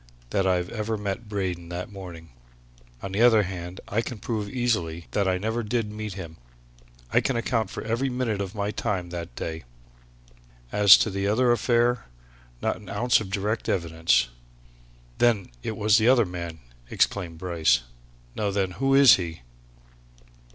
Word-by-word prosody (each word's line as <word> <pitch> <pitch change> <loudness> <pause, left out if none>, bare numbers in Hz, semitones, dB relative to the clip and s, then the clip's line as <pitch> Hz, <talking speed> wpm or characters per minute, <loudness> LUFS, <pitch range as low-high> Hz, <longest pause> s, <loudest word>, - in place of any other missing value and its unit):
that 95 -1 +1
I 90 -1 +3
ever 105 +5 -3
met 105 +2 -4
Braden 90 -4 -3
that 90 +4 -5
morning. 85 -5 -10 0.7
On 95 - -4
the 100 +4 0
other 115 -3 +6
hand, 90 -1 -6
I 110 +3 0
can 120 0 -6
prove, 105 -1 -3
easily, 95 -10 -1
that 100 -2 +1
I 95 -1 +2
never 110 +5 -2
did 110 -1 -2
meet 105 -1 -5
him; 85 -4 -8 0.8
I - - +5
can 135 - -1
account 115 -3 0
for - - -6
every 120 +5 -1
minute 125 -5 -1
of 95 +1 -5
my 100 0 -1
time 95 -6 -3
that 85 -8 -6
day. 80 0 -5 1.1
As 100 -1 +8
to 110 - 0
the 100 +1 -1
other 120 +4 +3
affair 120 +1 +2 0.6
not - - 0
an 105 - -13
ounce 120 +3 +2
of 100 - -6
direct 105 +3 -2
evidence!" 80 -8 +1 0.9
"Then 115 - +2
it 110 - -4
was 105 0 +4
the 110 - +2
other 125 -3 +5
man!" 85 -3 -6 0.3
exclaimed 85 -5 0
Bryce. 80 -8 +2 0.5
"Now 105 -1 -1
then, 95 -2 0
who 135 +8 +1
is 140 -2 +8
he?" 85 -5 -6
100 Hz, 165 wpm, -25 LUFS, 90-115 Hz, 1.1 s, As